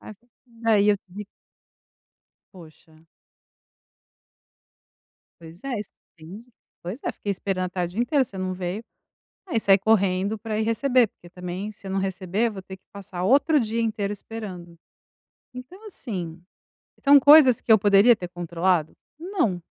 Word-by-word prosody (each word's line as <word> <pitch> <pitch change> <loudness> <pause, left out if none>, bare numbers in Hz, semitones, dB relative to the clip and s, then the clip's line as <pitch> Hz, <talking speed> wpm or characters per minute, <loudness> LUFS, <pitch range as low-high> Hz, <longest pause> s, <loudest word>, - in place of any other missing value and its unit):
Aí, 215 - -11
fa 230 +4 -35 0.5
é, - - +4
e 205 - +2
eu 205 - +4
tive 195 +2 -11 1.3
Poxa. 160 -2 -17 2.3
"Pois 165 +2 -14
é, 265 -4 -3
extendi". 190 0 -12 0.4
"Pois 185 +10 -6
é, - - -1
fiquei 200 - -4
esperando 185 -1 -2
a - - -9
tarde 180 +1 -4
inteira, 270 +3 +2
você 200 -6 -11
não 185 0 -3
veio.". 185 +4 -5 0.6
Aí 275 -11 0
saí 195 -2 +5
correndo 200 0 +1
pra 215 0 -4
ir - - +1
receber, 245 +2 +2
porque, 175 -3 -19
também, 180 +3 -6
se 205 - -18
eu - - -5
não 195 - 0
receber 190 +3 -1
eu 225 - -5
vou 195 - -8
ter 190 0 -11
que - - -49
passar 190 -3 -7
outro 285 - +4
dia 230 0 -1
inteiro 210 -3 -2
esperando. 190 -5 -9 0.8
Então 305 - -11
assim, 180 - -6 0.6
são 280 0 +7
coisas 285 -3 +7
que 225 - 0
eu 220 - +8
poderia 205 +3 +5
ter 180 -3 -7
controlado? 175 -1 -1 0.3
Não. 315 - -1
200 Hz, 155 wpm, -24 LUFS, 180-230 Hz, 2.3 s, eu